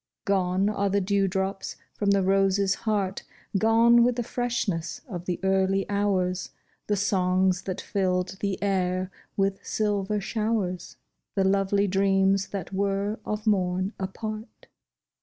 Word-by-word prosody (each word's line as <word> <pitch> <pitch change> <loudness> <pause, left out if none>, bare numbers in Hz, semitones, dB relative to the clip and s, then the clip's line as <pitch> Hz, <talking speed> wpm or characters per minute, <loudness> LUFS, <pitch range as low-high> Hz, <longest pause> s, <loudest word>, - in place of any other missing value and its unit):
Gone 190 -1 +2
are 200 -1 0
the 200 +1 +2
dew 200 0 +1
drops 190 +1 -2 0.2
from 205 - -1
the 200 -1 +3
rose's 195 0 +3
heart 200 -3 -1 0.2
— - - -3
Gone 230 +2 +5
with 245 0 +2
the 240 - -1
freshness 230 -9 -2
of 180 -6 -6
the 180 -2 -2
early 190 0 +2
hours, 190 -3 0 0.4
The 210 - +2
songs 185 -1 +2
that 185 -2 -3
filled 185 -1 -1
the 200 -2 -1
air 185 -1 0 0.3
with 195 0 0
silver 210 -1 0
showers, 210 -3 -2 0.4
The 195 - +2
lovely 195 +1 +2
dreams 195 0 +2
that 195 -2 -6
were 200 +2 -1
of 210 0 -3
morn 185 -1 +1
a 190 - -1
part. 215 +3 -7
195 Hz, 140 wpm, -26 LUFS, 190-205 Hz, 0.4 s, Gone